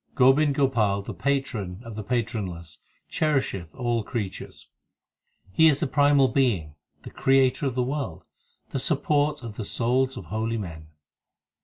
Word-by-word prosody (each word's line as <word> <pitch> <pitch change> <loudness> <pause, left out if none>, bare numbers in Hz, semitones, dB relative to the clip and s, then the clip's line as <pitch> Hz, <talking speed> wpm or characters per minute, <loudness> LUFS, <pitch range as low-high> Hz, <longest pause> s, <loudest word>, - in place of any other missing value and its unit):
Gobind 135 +3 +4
Gopal, 110 -8 +1
the - - -6
Patron 120 -10 -2
of 115 -2 -8
the 110 - -4
patronless, 95 -9 -3 0.3
Cherisheth 135 - -1
all 120 -3 -1
creatures; 105 -4 -6 0.8
He 160 +12 +5
is 145 -3 +3
the - - 0
primal 145 0 +4
Being, 100 - +1 0.3
the - - -9
Creator 135 +1 +2
of 130 - -3
the 125 - +1
world, 135 - -4 0.5
The 135 - -1
support 145 +1 +1
of 110 -3 -8
the 110 - -3
souls 125 +5 0
of 95 - -7
holy 110 +6 -2
men. 80 -7 -7
125 Hz, 145 wpm, -25 LUFS, 100-140 Hz, 0.8 s, He